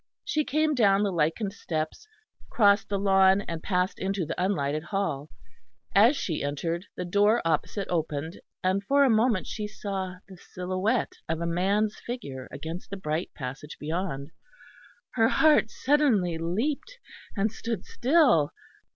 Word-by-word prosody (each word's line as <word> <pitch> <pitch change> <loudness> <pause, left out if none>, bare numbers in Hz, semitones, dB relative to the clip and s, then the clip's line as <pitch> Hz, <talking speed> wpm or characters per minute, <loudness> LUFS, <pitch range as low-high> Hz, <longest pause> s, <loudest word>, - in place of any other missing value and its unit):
She 310 -7 +1
came 310 +2 +1
down 205 -6 +4
the 200 - +1
lichened 170 +5 0
steps, 160 - -4 0.4
crossed 205 -2 +4
the 200 - 0
lawn, 195 0 +4
and 165 -4 -5
passed 180 0 0
into 195 -2 -1
the 180 - -2
unlighted 155 -5 -1
hall. 175 -8 -2 0.6
As 230 +9 +6
she 160 -5 -2
entered, 165 +6 -3
the 180 - -3
door 205 +5 +3
opposite 165 +5 -1
opened, 160 -1 -3 0.2
and 190 +2 +1
for 280 +6 +4
a 265 - +4
moment 220 -3 +2
she 210 -1 -4
saw 195 -3 -4
the 190 -2 -12
silhouette 185 +7 -2 0.2
of 160 0 -1
a 170 - -2
man's 200 +5 +1
figure 140 - -6
against 160 +6 -7
the 200 - -5
bright 160 -1 -2
passage 135 +3 -7
beyond. 155 -2 -3 0.8
Her 225 -2 +3
heart 305 -8 +4
suddenly 225 - +2
leapt, 275 - -2 0.4
and 205 +2 +1
stood 230 -3 -4
still. 250 - +3
190 Hz, 145 wpm, -27 LUFS, 165-220 Hz, 0.8 s, As